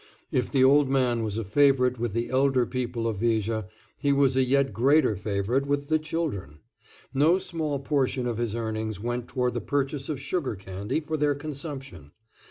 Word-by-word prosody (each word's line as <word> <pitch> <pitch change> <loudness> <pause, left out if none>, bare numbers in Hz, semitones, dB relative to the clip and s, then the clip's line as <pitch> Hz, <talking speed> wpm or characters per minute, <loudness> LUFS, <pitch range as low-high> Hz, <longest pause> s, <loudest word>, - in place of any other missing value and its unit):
If 125 - 0
the 135 -2 +3
old 140 +1 +5
man 125 -3 +2
was 110 -1 -2
a 115 - -1
favorite 125 +2 +3
with 120 -3 -2
the 115 +1 -2
elder 130 -1 +3
people 120 -2 -3
of 110 -3 -2
Viger, 110 -1 0 0.3
he 145 -1 +2
was 140 -2 +3
a 130 - +4
yet 135 -1 +2
greater 135 +2 +3
favorite 105 +7 -1
with 140 0 -1
the 155 0 +3
children. 155 - -4 0.6
No 155 +6 +4
small 160 -6 -2
portion 135 -2 0
of 120 -2 -2
his 115 -2 -1
earnings 110 -2 -3
went 120 +2 -3
toward 125 -2 -1
the 120 - -2
purchase 140 0 -2
of 145 -4 -2
sugar 145 -3 -2
candy 100 +9 -4
for 155 0 -3
their 145 -1 +2
consumption. 135 - -8
130 Hz, 180 wpm, -26 LUFS, 115-140 Hz, 0.6 s, old